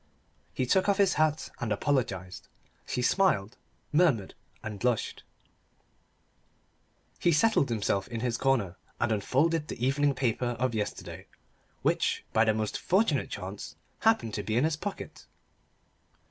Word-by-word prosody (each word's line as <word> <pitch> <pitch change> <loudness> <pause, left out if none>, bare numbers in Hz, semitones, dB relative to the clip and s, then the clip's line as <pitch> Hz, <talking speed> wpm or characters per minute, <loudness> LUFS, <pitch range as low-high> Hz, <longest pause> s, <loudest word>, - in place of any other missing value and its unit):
He 130 - -1
took 190 +10 +2
off 200 - +3
his 200 -2 +4
hat 155 0 +1
and 115 -3 -3
apologised. 100 - -1 0.4
She 125 - -1
smiled, 120 - +2 0.4
murmured, 150 - +2 0.3
and 105 -2 -5
blushed. 125 -1 -1 2.0
He 175 - +3
settled 160 - +3
himself 100 -3 0
in 115 -2 -5
his 120 -1 0
corner, 120 -9 +1 0.2
and 120 -1 +1
unfolded 150 +9 +1
the 120 - -3
evening 140 +1 +2
paper 120 -1 0
of 130 -1 0
yesterday 105 -2 -4 0.6
which, - - +1
by 110 - +5
the 110 - +3
most 110 -1 -2
fortunate 185 - +1
chance, 100 +1 -7 0.2
happened 220 - +2
to - - -2
be 110 +1 -1
in 125 - +3
his 160 0 +1
pocket. 190 +6 -7
125 Hz, 135 wpm, -29 LUFS, 110-155 Hz, 2.0 s, by